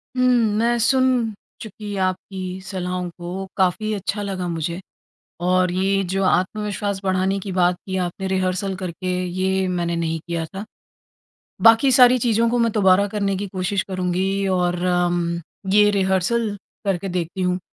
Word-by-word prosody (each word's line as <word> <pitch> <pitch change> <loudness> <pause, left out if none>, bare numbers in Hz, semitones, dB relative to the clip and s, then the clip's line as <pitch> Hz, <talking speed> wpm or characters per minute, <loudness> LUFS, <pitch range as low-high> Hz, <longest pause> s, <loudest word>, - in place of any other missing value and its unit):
हुँ, 255 - +1 0.3
मैं 235 +2 +2
सुन 250 -2 +2 0.3
चुकी 210 -1 -7
आपकी 185 0 -5
सलाहों 180 -1 -4
को 180 +3 -5
काफ़ी 200 +3 +1
अच्छा 205 +1 -3
लगा 190 -3 -3
मुझे। 170 +1 -3 0.6
और 180 +1 +2
ये 195 +2 +1
जो 195 0 0
आत्मविश्वास 200 +1 0
बढ़ाने 190 +1 +1
की 195 0 -6
बात 180 -1 +2
की 190 -1 -3
आपने 190 +2 -5
रिहर्सल 190 +1 -1
करके, 185 0 -5 0.2
ये 190 +1 0
मैंने 170 -1 -1
नहीं 165 -1 -1
किया 170 -2 -2
था। 195 +2 -5 1.0
बाकी 230 +4 +6
सारी 250 0 +7
चीज़ों 230 -1 +2
को 245 - +1
मैं 230 -1 +2
दोबारा 200 -1 +4
करने 200 -1 -1
की 200 +1 -4
कोशिश 190 +1 -1
करुँगी 190 +1 -1
और 180 -2 +1
उम, 175 -1 +1 0.3
ये 210 0 +6
रिहर्सल 195 +3 +1 0.4
करके 195 -1 -1
देखती 175 +1 -3
हूँ, 180 0 0
190 Hz, 150 wpm, -22 LUFS, 180-205 Hz, 1.0 s, सारी